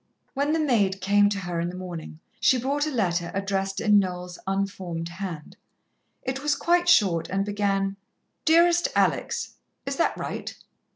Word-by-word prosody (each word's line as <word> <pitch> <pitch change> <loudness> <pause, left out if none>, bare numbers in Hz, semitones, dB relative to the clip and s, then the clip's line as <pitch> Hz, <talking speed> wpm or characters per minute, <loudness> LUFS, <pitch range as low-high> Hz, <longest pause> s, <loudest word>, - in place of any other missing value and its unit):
When 285 +2 0
the 325 - +1
maid 210 -10 +2
came 205 +2 +4
to 205 - -2
her 175 -3 -3
in 170 +1 -1
the 180 - -7
morning, 170 -3 -7 0.2
she 260 - +4
brought 280 +4 0
a - - 0
letter 175 - 0
addressed 195 -1 -1
in 210 -2 +5
Noel's 180 -2 -4
unformed 190 -4 -2
hand. 170 -3 -7 0.7
It 265 +1 -3
was 295 0 +1
quite 350 +1 +2
short, 185 - +4
and 195 +1 0
began: 200 -1 0 0.5
"DEAREST 340 +4 +5
ALEX - - 0 0.3
(is - - -3
that - - +1
right?)" - - -5
195 Hz, 160 wpm, -25 LUFS, 180-260 Hz, 0.7 s, in